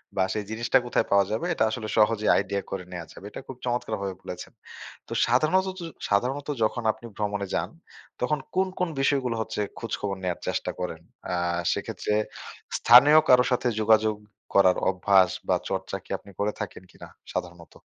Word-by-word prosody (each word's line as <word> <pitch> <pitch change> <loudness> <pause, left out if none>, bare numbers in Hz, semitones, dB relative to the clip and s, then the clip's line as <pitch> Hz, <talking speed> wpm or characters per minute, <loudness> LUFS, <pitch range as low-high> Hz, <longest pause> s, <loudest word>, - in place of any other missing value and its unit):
বা 95 - +3
সেই 105 - -2
জিনিসটা 115 +4 +2
কোথায় 120 - +1
পাওয়া 100 0 +5
যাবে 110 +10 -1
এটা 135 - +1
আসলে 110 0 -4
সহজেই 110 0 +3
আইডিয়া 100 0 -1
করে 95 -1 -3
নেয়া 90 -2 -6
যাবে। - - -12
এটা - - -8
খুব 130 - -8
চমৎকার 120 -2 -1
ভাবে 95 -1 -3
বলেছেন। 90 0 -8 0.6
তো - - -6
সাধাণতত 185 +10 +2 0.3
সাধারণত 130 +8 0 0.2
যখন 120 +2 0
আপনি 110 +2 -14
ভ্রমণে 100 -2 -2
যান, - - -1 0.5
তখন 145 +4 +1 0.2
কোন 190 +1 +3
কোন 180 -1 +1
বিষয়গুলো 135 -4 +1
হচ্ছে 110 -1 -3 0.2
খোঁজখবর 105 -4 -3
নেওয়ার 90 -1 -2
চেষ্টা - - -1
করেন? 90 -3 -4 0.3
আ - - -1 0.4
সেক্ষেত্রে 105 - -2 0.6
স্থানীয় 140 +6 +8
কারো 125 0 +7
সাথে 125 0 +1
যোগাযোগ 110 0 +4 0.4
করার 95 -2 +5
অভ্যাস 95 0 +4 0.2
বা - - +3
চর্চা 95 0 -3
কি - - -24
আপনি 100 - -16
করে 105 +1 +1
থাকেন 95 -2 -6
কিনা - - -12 0.3
সাধারণত? 85 -1 -6
110 Hz, 170 wpm, -26 LUFS, 100-125 Hz, 0.6 s, স্থানীয়